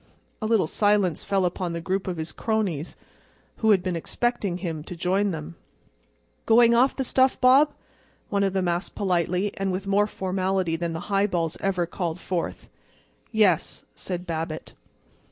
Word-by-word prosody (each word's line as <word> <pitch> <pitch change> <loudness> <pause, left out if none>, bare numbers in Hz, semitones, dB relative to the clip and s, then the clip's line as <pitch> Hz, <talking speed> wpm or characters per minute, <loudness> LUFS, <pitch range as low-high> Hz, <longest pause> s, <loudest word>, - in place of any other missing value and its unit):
A 215 - -1
little 220 -6 +3
silence 205 -1 +1
fell 195 -2 +1
upon 180 -1 -2
the 170 - -3
group 190 +3 -2
of 180 -2 -3
his 160 +1 -4
cronies, 200 -9 -2 0.6
who 220 - +1
had 195 -4 +5
been 180 -2 -1
expecting 205 +1 -1
him 165 -4 -4
to 180 - -7
join 190 +4 +1
them. 120 - -6 0.9
"Going 235 +1 +6
off 250 +3 +4
the 270 - -1
stuff, 260 +1 +2
Bob?" 275 +4 +5 0.5
one 200 -1 +1
of 195 -1 +1
them 190 -2 0
asked 175 +2 -2
politely 185 0 0
and 195 -1 -1
with 185 +2 -3
more 200 +1 +3
formality 190 -3 -1
than 170 0 -3
the 165 - -4
highballs 185 -5 +1
ever 185 -3 0
called 170 0 -4
forth. 180 -2 -3 0.6
"Yes," 210 -7 +2
said 180 -1 -5
Babbitt. 160 -2 -4
185 Hz, 160 wpm, -25 LUFS, 170-205 Hz, 0.9 s, Going